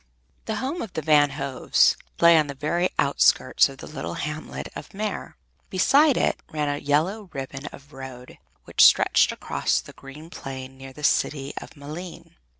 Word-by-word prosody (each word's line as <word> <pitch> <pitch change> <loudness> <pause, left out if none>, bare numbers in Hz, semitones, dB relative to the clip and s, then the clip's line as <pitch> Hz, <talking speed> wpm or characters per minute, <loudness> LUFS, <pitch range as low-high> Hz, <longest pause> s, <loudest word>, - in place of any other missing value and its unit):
The 220 - -2
home 270 +9 -3
of 215 - -7
the 160 - -4
Van 145 -1 +5
Hoves 135 -1 +2 0.2
lay 170 0 +7
on 155 -2 +3
the 140 - -6
very 170 +6 0
outskirts 140 -1 +3
of 135 - -11
the - - -10
little 140 -3 -6
hamlet 150 +1 -5
of - - -9
Meer. 210 -1 -4 0.3
Beside 275 +10 +4
it - - +1
ran 150 -1 -2
a 145 0 -2
yellow 175 +9 0
ribbon 135 +1 -6
of 145 +1 -13
road 130 -2 -10 0.2
which - - +3
stretched - - +5
across - - -1
the - - -11
green 150 +5 -12
plain 130 -4 -8
clear 135 0 -9
to 130 - -16
the 150 - -11
city 140 -1 +1
of - - -9
Malines. 155 +5 -9
150 Hz, 175 wpm, -24 LUFS, 135-170 Hz, 0.3 s, lay